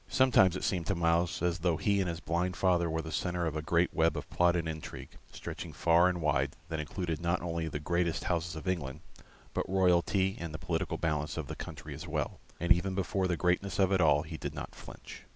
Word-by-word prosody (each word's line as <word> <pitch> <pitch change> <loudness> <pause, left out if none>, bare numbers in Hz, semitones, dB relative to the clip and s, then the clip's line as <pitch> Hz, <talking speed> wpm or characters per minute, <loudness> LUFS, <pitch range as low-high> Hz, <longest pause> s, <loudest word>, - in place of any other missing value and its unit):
Sometimes 125 -9 +5
it - - -4
seemed 85 -4 -1
to 100 - +1
Myles 85 0 +1
as 90 +1 +1
though 85 -2 +1
he 100 +3 +2
and 95 -2 +1
his 85 -1 -4
blind 90 +2 -1
father 85 -3 +2
were 80 0 -1
the 80 - -6
centre 90 +2 -1
of 80 -2 -2
a 75 - -1
great 85 +3 +1
web 80 0 +2
of - - -5
plot 90 0 +3
and 85 -2 -1
intrigue, 80 -1 -6 0.2
stretching - - -7
far 85 +2 +4
and 90 -1 -2
wide, 70 -1 +1
that 80 -1 -2
included 80 +1 -3
not 85 +1 0
only 85 -1 -2
the 75 -1 -3
greatest 85 +2 0
houses 85 -1 -1
of 80 +4 -7
England, 75 -5 -2 0.5
but - - -2
royalty 95 +1 +2
and 80 -2 -5
the - - -2
political 85 0 -2
balance 75 -1 -1
of 80 - -2
the - - -6
country - - -7
as - - -8
well, - - -2 0.2
and 85 +1 -2
even 95 +2 +4
before 95 0 0
the 90 -2 0
greatness 90 +3 +1
of 95 -1 +3
it 95 -1 +3
all 75 -2 +4
he 80 0 -7
did - - -5
not - - -6
flinch. - - -11
85 Hz, 230 wpm, -31 LUFS, 80-90 Hz, 0.5 s, Sometimes